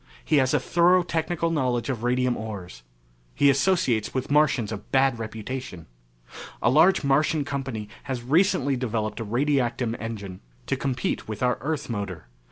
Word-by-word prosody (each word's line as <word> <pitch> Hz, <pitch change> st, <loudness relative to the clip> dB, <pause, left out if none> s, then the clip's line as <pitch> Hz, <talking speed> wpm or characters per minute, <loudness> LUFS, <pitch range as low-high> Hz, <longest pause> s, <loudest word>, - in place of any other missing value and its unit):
He 155 Hz, -, +3 dB
has 130 Hz, -2 st, +3 dB
a -, -, +3 dB
thorough 175 Hz, +1 st, +3 dB
technical 165 Hz, 0 st, -1 dB
knowledge 125 Hz, -6 st, 0 dB
of 130 Hz, -5 st, -3 dB
radium 125 Hz, 0 st, +1 dB
ores. 95 Hz, -, -7 dB, 0.5 s
He 140 Hz, -, +5 dB
associates 135 Hz, -, +1 dB
with 130 Hz, +1 st, -2 dB
Martians 140 Hz, -7 st, +3 dB
of 105 Hz, -1 st, -7 dB
bad 135 Hz, -3 st, +3 dB
reputation. 110 Hz, -4 st, -6 dB, 0.7 s
A 120 Hz, -, +2 dB
large 160 Hz, +5 st, +5 dB
Martian 145 Hz, +2 st, +2 dB
company 135 Hz, -7 st, -4 dB, 0.2 s
has 125 Hz, -3 st, -4 dB
recently 140 Hz, -1 st, +2 dB
developed 110 Hz, -3 st, -2 dB
a -, -, -2 dB
radiactum 120 Hz, 0 st, 0 dB
engine 100 Hz, -5 st, -6 dB, 0.3 s
to -, -, 0 dB
compete 130 Hz, -3 st, -2 dB
with 110 Hz, +2 st, -5 dB
our 125 Hz, 0 st, +1 dB
Earth 150 Hz, +1 st, -2 dB
motor. 100 Hz, -, -5 dB
125 Hz, 155 wpm, -25 LUFS, 110-145 Hz, 0.7 s, He